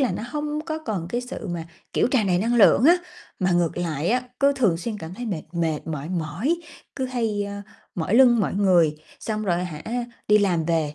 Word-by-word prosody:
là 265 - +2
nó - - -4
hông 300 0 -2
có 315 -1 -3
còn 210 - -4
cái 240 +6 -1
sự 250 +1 -7
mà, 170 -2 -4 0.3
kiểu, - - +2
tràn 230 -7 +2
đầy 180 -1 +2
năng 230 +5 +1
lượng 230 +2 +6
á, 340 +4 +7 0.4
mà 185 0 +1
ngược 175 -1 +1
lại 165 -2 -2
á, 250 +2 +2 0.2
cứ 280 0 +5
thường 210 -11 +3
xuyên 210 +4 -4
cảm 165 0 -8
thấy 245 +4 -6
mệt 180 -7 -3
mệt 165 -3 -1
mỏi 155 -1 -4
mỏi, 180 - -1 0.4
cứ 265 - -1
hay, 225 -5 -1
a, 200 0 -6 0.3
mỏi 175 +4 -1
lưng 240 -2 +6
mỏi 195 - 0
người, 180 -6 +3 0.2
xong 215 -1 -3
rồi, 180 -1 0
hả, 155 -4 -7 0.5
đi 210 0 +6
làm 180 -5 +1
về 155 -2 0
200 Hz, 220 wpm, -24 LUFS, 170-240 Hz, 0.5 s, á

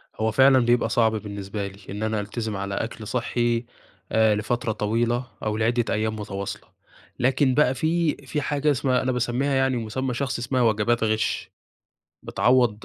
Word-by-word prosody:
هو 110 +1 0
فعلًا 130 +2 +6
بيبقى 120 0 +2
صعب 115 -2 +3
بالنسبة 100 -1 -5
لي، 100 0 -12
إن 105 +2 -4
أنا 110 -1 0
ألتزم 105 +1 -4
على 100 0 -3
أكل 110 0 -4
صحّي 120 0 0 0.5
آآ 110 -1 +4
لفترة 110 +2 -1
طويلة، 115 +4 0 0.2
أو 110 -1 -1
لعدّة 115 +2 +1
أيام 110 +1 -1
متواصلة، 100 -2 -6 0.5
لكن 130 +1 +2
بقى 135 -2 +3
في 160 +3 +1
في 150 +2 -2
حاجة 145 +1 +1
اسمها 130 -1 +1
أنا 130 - 0
باسميها 125 +3 0
يعني 135 -1 +2
مسمى 125 +3 -3
شخصي 130 -1 -2
اسمها 125 +1 0
وجبات 115 +1 +2
غش، 110 -1 -1 0.7
بتعوض 120 -4 +2
120 Hz, 160 wpm, -24 LUFS, 110-130 Hz, 0.7 s, فعلًا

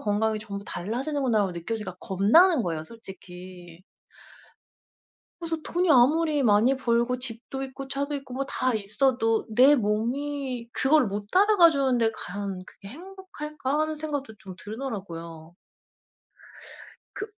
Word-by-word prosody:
건강이 215 +1 0
전부 200 -2 -7
달라지는구나'라고 225 - -1
느껴지니까 185 +2 -5
겁나는 245 - +4
거예요. 160 -3 -3
솔직히. 180 -4 -11 1.6
그래서 330 -1 -3
'돈이 350 0 0
아무리 295 +3 +4
많이 225 +4 +4
벌고 240 0 +1
집도 255 +2 -4
있고 270 0 -7
차도 280 +2 -2
있고 275 -2 -7
뭐 275 +2 -2
다 255 -2 0
있어도 225 +2 +1
내 255 +6 +6
몸이 250 +3 -2
그걸 280 +2 +3
못 205 +1 -4
따라가 390 -3 +6
주는데 260 -6 +1
과연 195 -1 -6
그게 195 - -14
행복할까' 305 - -5
하는 310 0 0
생각도 290 -7 -4
좀 195 -3 -11
들더라고요. 175 -8 -7 1.6
그 405 - -5
240 Hz, 290 characters per minute, -26 LUFS, 205-285 Hz, 1.6 s, 내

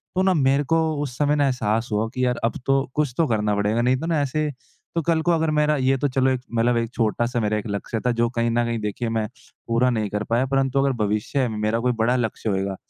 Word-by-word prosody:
तो 185 - +2
ना 190 -1 +3
मेरे 140 -1 +2
को 165 - +4 0.2
उस 130 -2 -6
समय 145 0 +2
ना 145 -1 +2
एहसास 115 -2 0
हुआ 105 +2 0
कि, 130 +1 -1
यार 125 -1 0
अब 115 - -1
तो 135 0 +2
कुछ 145 -5 0
तो 165 -2 +3
करना 105 -2 +1
पड़ेगा 105 +3 +1
नहीं 125 +1 +2
तो 160 - -4
ना 160 -3 +1
ऐसे 150 +2 -1 0.4
तो 165 - +2
कल 165 0 +1
को 175 +1 +1
अगर 160 -1 +1
मेरा 150 0 +2
ये 135 0 +2
तो 145 - 0
चलो 130 0 +1
एक 130 -1 -1
मतलब 120 +1 +2
एक 115 0 -2
छोटा-सा 120 +2 0
मेरा 105 0 0
एक 105 - -4
लक्ष्य 100 +2 -3
था 125 - +3
जो 120 0 +3
कहीं 115 0 +1
न 120 +1 +2
कहीं 115 -1 -2
देखिए 105 +3 -3
मैं 110 -1 -1 0.4
पूरा 115 +2 +2
नहीं 110 -4 -1
कर 105 +1 -2
पाया 120 +3 +2
परंतु 135 0 +1
अगर 135 0 +2
भविष्य 110 +6 0
में 110 - -5
मेरा 110 +2 0
कोई 125 +1 +1
बड़ा 125 +2 +2
लक्ष्य 115 -2 -2
होएगा 95 0 -1
125 Hz, 260 wpm, -23 LUFS, 110-140 Hz, 0.4 s, को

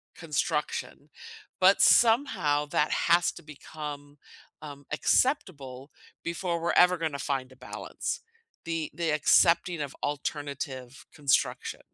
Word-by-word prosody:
construction, - - -3 0.5
but, 190 +2 +5
somehow, 225 - +4
that 150 +1 0
has 170 +1 +3
to - - -12
become, 145 -1 -9 0.4
um, 145 -2 -10
acceptable 145 - 0 0.3
before 170 0 -2
we're 170 - 0
ever 180 0 +5
gonna 160 -4 -3
find 135 -2 -3
a - - -15
balance; - - -5 0.5
the 165 -2 -3
the 170 -2 -1
accepting 170 +2 +3
of 140 - -5
alternative 140 -2 -5
construction. 145 -4 0
150 Hz, 110 wpm, -28 LUFS, 140-170 Hz, 0.5 s, but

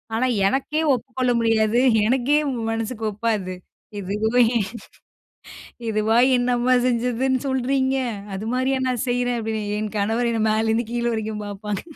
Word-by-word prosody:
ஆனா, 250 +3 +1 0.2
எனக்கே 275 +7 0
ஒப்புக்கொள்ள 255 0 -1
முடியாது. 225 +1 +2 0.2
எனக்கே 265 +5 +2 0.3
மனசுக்கு 225 0 -3
ஒப்பாது 205 -4 -2 0.4
இதுவும் 210 +5 0 1.5
இதுவா 220 +1 +2 0.2
என்ன 245 0 0
அம்மா 255 +1 +3
செஞ்சதுன்னு 250 +2 +1
சொல்லுறீங்க? 265 0 0 0.4
அது 190 - -5
மாதிரியே 260 +1 +1
நான் 250 -1 -1
செய்யுறேன், 245 0 0
அப்டீன்னு 220 -1 -3 0.2
என் 215 0 -4
கணவர் 225 +4 0
என்னைய 225 -2 0
மேலேருந்து 225 +2 +1
கீழ 240 0 -1
வரைக்கும் 220 -1 -3
பாப்பாங்க. 205 0 -5
230 Hz, 125 wpm, -22 LUFS, 215-255 Hz, 1.5 s, அம்மா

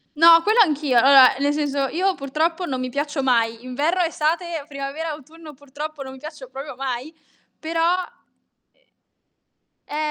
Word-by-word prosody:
No, 330 +2 +7
quello 430 +6 +1
anch'io. 295 - +1
Vabbè, 265 0 +7
nel 285 +1 +1
senso 285 -2 -1
io 370 +6 0
purtroppo 320 +6 -2
non 260 -4 -3
mi 255 - -3
piaccio 290 +2 -3
mai. 230 -2 0
Inverno, 300 +8 0
estate, 330 -1 -2
primavera, 280 +3 -5
autunno, 310 +1 -11
purtroppo 285 +2 -8
non 265 -1 -8
mi 265 - -12
piaccio 300 -2 -10
proprio 270 +2 -8
mai, 265 +3 -5 0.4
però, 330 +2 0 1.9
uhm 295 - -7
290 Hz, 145 wpm, -22 LUFS, 265-325 Hz, 1.9 s, No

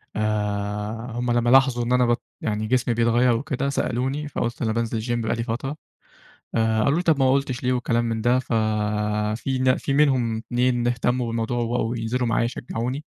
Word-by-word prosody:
آآ 105 +2 -2
هُم 120 +1 -2
لما 120 0 +2
لاحظوا 130 -2 +4
إن 120 +1 0
أنا 125 -1 +4
بت 120 0 +1 0.2
يعني 110 -1 -2
جسمي 125 0 +1
بيتغير 120 +1 +3
وكده 135 +2 -2
سألوني، 135 +3 -1
فقلت 120 -4 -3
أنا 110 -2 +1
بانزل 115 0 -1
الچيم 120 +1 -1
بقى 110 - 0
لي 115 - -2
فترة، 130 +5 -3 0.8
آآ 110 -1 +2
قالوا 140 +3 +3
لي - - 0
طب 160 -5 +2
ما 130 -1 +4
قلتش 135 -1 -1
ليه 125 - +2
وكلام 120 -1 0
من 115 -1 -2
ده، 120 +2 +3
ف 130 - -5 0.9
في 130 +2 -2
ن 130 0 +3
في 140 - -3
منهم 130 -6 +2
اتنين 120 +1 0
اهتموا 125 +1 0
بالموضوع 115 +1 -2
وبقوا 120 0 -1
ينزلوا 120 +2 -1
معايا 115 +1 +1
يشجعوني، 125 +4 -4
120 Hz, 185 wpm, -23 LUFS, 115-130 Hz, 0.9 s, لاحظوا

